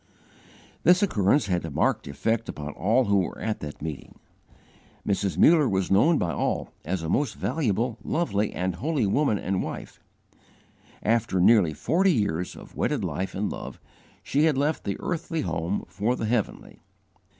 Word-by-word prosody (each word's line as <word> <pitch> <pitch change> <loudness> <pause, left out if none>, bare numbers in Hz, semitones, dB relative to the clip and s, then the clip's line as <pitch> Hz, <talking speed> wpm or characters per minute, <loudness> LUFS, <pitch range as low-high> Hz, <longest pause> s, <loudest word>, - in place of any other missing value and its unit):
This 180 +3 +5
occurrence 110 - +2
had 90 -3 -1
a 80 - -4
marked 70 - 0
effect 110 - -1
upon 75 0 -6
all 115 +8 +2
who 100 -1 +3
were 90 - -3
at 110 -1 -2
that 75 0 -8
meeting. 80 -4 -7 0.9
Mrs. 100 -4 0
Muller 155 -5 +5
was 95 -1 -1
known 150 - +5
by 85 - 0
all - - -2
as 90 +2 -3
a - - -3
most 135 - 0
valuable, 120 - -1
lovely, 110 -12 0
and 90 -1 -2
holy 140 - 0
woman 110 +2 +2
and 95 -1 -1
wife. - - -7 1.0
After 110 -4 +1
nearly 90 -5 +5
forty 185 - +2
years 90 - -1
of - - -13
wedded - - 0
life 95 +1 -3
and 100 +2 -1
love, - - -7 0.4
she 145 +3 +2
had 155 -4 +2
left 150 +3 0
the 100 - -2
earthly 165 -2 -2
home 85 - -2
for 110 +5 -1
the 115 - -3
heavenly. 110 -1 -2
105 Hz, 160 wpm, -26 LUFS, 90-140 Hz, 1.0 s, This